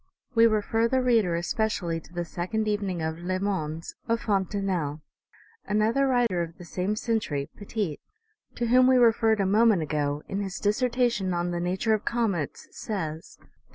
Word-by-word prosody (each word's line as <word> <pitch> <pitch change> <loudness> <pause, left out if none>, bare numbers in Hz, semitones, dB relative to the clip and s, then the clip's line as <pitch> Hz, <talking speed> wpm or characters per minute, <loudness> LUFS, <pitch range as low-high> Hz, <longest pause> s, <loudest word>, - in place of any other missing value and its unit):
We 230 -1 +6
refer 225 +1 +1
the 260 +2 +1
reader, 230 -9 +3
especially, 175 -1 -1
to 165 - -18
the 175 0 -3
second 200 +6 -2
evening 200 -5 -1
of 160 +1 -3
L,es 185 +2 -2
Mondes 165 -5 -3
of 230 0 0
Fontenelle. 190 -7 -1 0.6
Another 220 +6 +2
writer 240 -9 +2
of 165 0 -5
the 175 - -11
same 185 +4 -2
century, 210 -12 -2
Petit, 205 -6 -3 0.6
to 240 - -1
whom 250 +2 +5
we 260 0 +5
referred 225 -2 +4
a 195 - +2
moment 210 -2 +4
ago, 145 -1 -1
in 195 - -3
his 195 -1 -4
Dissertation 230 -3 +1
on 175 0 -1
the 175 - -2
Nature 185 +6 0
of 215 - 0
Comets 210 - -1
says, 165 -7 -5
that - - -23
OMEGA. - - -28
200 Hz, 170 wpm, -27 LUFS, 175-225 Hz, 0.6 s, We